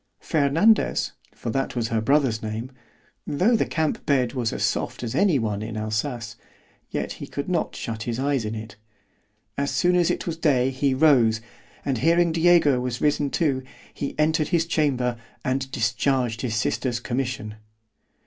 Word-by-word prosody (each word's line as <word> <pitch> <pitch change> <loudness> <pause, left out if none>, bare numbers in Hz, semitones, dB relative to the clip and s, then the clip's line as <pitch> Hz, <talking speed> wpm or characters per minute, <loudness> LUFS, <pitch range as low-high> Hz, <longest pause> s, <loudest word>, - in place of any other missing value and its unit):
Fernandez 165 +8 +2 0.2
(for 115 - -4
that 135 +2 -2
was 115 -2 -1
her 115 -1 0
brother's 130 -2 +2
name)——tho' 130 - -3
the - - +1
camp 160 -2 -1
bed 130 -4 +2
was 120 -4 -1
as - - -3
soft - - -1
as 115 - -3
any 190 -7 +3
one 105 -4 -2
in 110 0 -5
Alsace, 110 +2 -3 0.5
yet - - -3
he - - -7
could - - -5
not - - -1
shut 110 -1 -5
his 115 +1 -3
eyes 140 -2 +1
in 110 +1 -3
it.——As 105 +3 -9
soon 180 0 +2
as 175 -2 +3
it - - -1
was 165 -2 -3
day 135 -5 +2
he 135 0 0
rose, 130 -7 +4 0.5
and 135 -4 0
hearing 170 +4 +3
Diego 165 -5 +4
was 125 -1 -3
risen 145 -1 +1
too, 140 -3 0 0.3
he 140 - -5
entered 155 0 +2
his 165 -2 +1
chamber, 130 -7 0 0.3
and 130 +1 -1
discharged 120 -1 0
his 115 -4 -2
sister's 120 +2 -1
commission. 120 -4 -3
130 Hz, 160 wpm, -24 LUFS, 115-150 Hz, 0.5 s, rose